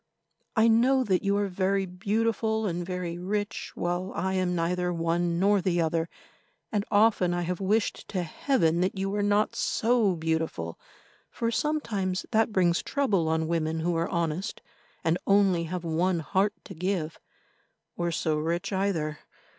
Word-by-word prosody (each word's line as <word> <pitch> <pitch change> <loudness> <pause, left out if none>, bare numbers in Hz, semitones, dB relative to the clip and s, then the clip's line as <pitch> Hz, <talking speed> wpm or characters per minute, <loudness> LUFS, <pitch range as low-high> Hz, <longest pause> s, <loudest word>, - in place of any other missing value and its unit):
I 225 0 +5
know 250 +4 +4
that 190 -6 +1
you 200 0 +2
are 205 0 +1
very 195 +1 0
beautiful 220 +4 0
and 175 -2 -2
very 175 -1 -4
rich, 205 +4 -3
while 175 +2 -2
I 190 +2 -1
am 185 -1 0
neither 180 +1 0
one 170 0 0
nor 200 +2 +3
the 175 -1 +1
other, 165 0 0 0.6
and 205 -2 0
often 205 -4 +3
I 175 - -1
have 180 +2 -3
wished 210 +3 0
to 185 -3 -2
Heaven 170 - +1
that 185 +2 0
you 195 +1 -1
were 205 0 0
not 205 +1 +2
so 225 -5 +2
beautiful, 160 - -2 0.5
for 230 0 -2
sometimes 215 -10 -1
that 225 0 +3
brings 180 -3 +2
trouble 205 - +1
on 160 0 +1
women 160 -1 -1
who 170 +1 0
are 165 +1 0
honest 170 +4 -2 0.4
and 165 +2 +1
only 195 -4 +4
have 180 +1 -4
one 170 +1 +1
heart 195 +5 +1
to - - -9
give, 170 -2 -2 0.8
or 175 0 -1
so 155 -1 0
rich 170 +5 -2
either. 165 -6 -1
180 Hz, 160 wpm, -27 LUFS, 170-205 Hz, 0.8 s, I